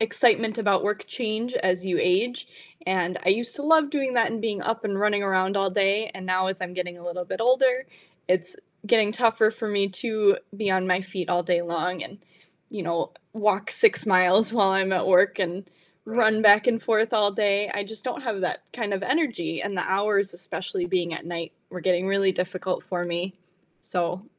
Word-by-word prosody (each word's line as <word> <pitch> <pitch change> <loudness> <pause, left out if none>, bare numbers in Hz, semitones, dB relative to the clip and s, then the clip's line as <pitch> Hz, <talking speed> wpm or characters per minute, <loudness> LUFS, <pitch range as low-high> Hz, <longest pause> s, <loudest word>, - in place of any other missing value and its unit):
excitement 225 0 +2
about 200 -4 +2
work 205 -1 -2
change 230 0 -3
as 180 0 0
you 180 -2 0
age? 220 +8 0 0.4
And 180 -1 0
I - - +1
used 230 +5 +1
to 285 - -6
love 310 -1 +4
doing 270 -4 -1
that 230 -2 +3
and 225 -1 -5
being 210 -4 -2
up 225 +3 -2
and 200 -2 -2
running 205 0 +1
around 190 0 +1
all 195 -1 +1
day, 200 +3 +1
and 185 -1 -8
now 185 0 +1
as 190 0 -4
I'm 180 -1 -5
getting 180 -1 -5
a 175 - -14
little 175 +1 -4
bit 175 - -5
older, 255 +2 +3 0.4
it's 180 0 0 0.3
getting 215 -1 +3
tougher 225 -2 +3
for 220 0 -5
me 200 -1 +1
to 210 +1 +1 0.2
be 205 -1 -1
on 190 0 +1
my 180 0 +2
feet 185 -2 -5
all 175 0 +2
day 175 0 +1
long 170 +1 -3
and, 200 - -10 0.5
you 205 -3 -5
know, 170 -1 -2 0.2
walk 210 -2 0
6 455 -3 +3
miles 190 +2 +4
while 200 -5 +4
I'm 190 0 +1
at 185 - +1
work, 185 +1 +4
and 185 0 -3 0.4
run 220 -1 +2
back 210 +1 +7
and 230 -2 +1
forth 220 0 +1
all 210 -2 +3
day, 205 0 +1
I 205 - -2
just 215 0 -11
don't 255 +2 -4
have 225 -6 -3
that 180 - -2
kind 225 -4 -3
of 195 0 -2
energy, 195 - -1
and 200 -1 -4
the 180 - 0
hours, 200 0 0
especially 180 0 -5
being 175 -2 -1
at - - -8
night, 170 -1 -5 0.2
were 180 - -7
getting 180 +1 +1
really 195 -1 +2
difficult 185 0 -3
for 175 -2 -3
me. 175 +2 -4 0.4
So 180 +2 -3
195 Hz, 205 wpm, -25 LUFS, 185-220 Hz, 0.5 s, back